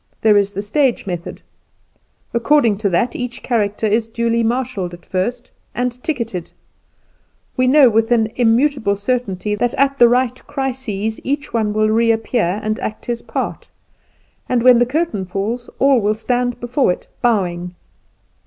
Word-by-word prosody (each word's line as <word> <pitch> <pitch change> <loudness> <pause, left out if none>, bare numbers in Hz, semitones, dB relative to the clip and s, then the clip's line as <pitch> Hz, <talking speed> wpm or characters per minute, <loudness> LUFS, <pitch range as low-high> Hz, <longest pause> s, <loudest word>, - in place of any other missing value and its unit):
There 215 -1 +5
is 200 0 +2
the 200 +1 -4
stage 260 +4 +1
method. 175 -3 -6 0.9
According 235 -3 +3
to 210 -2 0
that 210 +7 0
each 245 0 -5
character 215 -3 0
is 220 +2 +1
duly 235 0 0
marshalled 230 -6 -2
at 175 - -20
first, 215 +7 -3 0.2
and 250 0 -3
ticketed; 230 - -3 1.1
we 255 -1 +2
know 275 0 +7
with 225 0 +2
an 225 -2 +2
immutable 240 -2 +2
certainty 210 -2 -2
that 235 +3 -1
at 275 0 +1
the 240 -1 +7
right 250 0 +1
crises 245 -6 -3
each 285 +2 -3
one 220 -2 +1
will 215 +1 +1
reappear 225 -3 +1
and 215 0 -2
act 215 - -5
his 235 -1 -3
part, - - -4 0.8
and, 245 -2 +1
when 250 -1 +7
the 245 - +3
curtain 280 - -1
falls, 205 +6 -4
all 270 -3 +4
will 210 +1 +1
stand 245 +2 -1
before 245 -2 +1
it - - -5 0.2
bowing. 180 -6 0
230 Hz, 155 wpm, -18 LUFS, 210-250 Hz, 1.1 s, know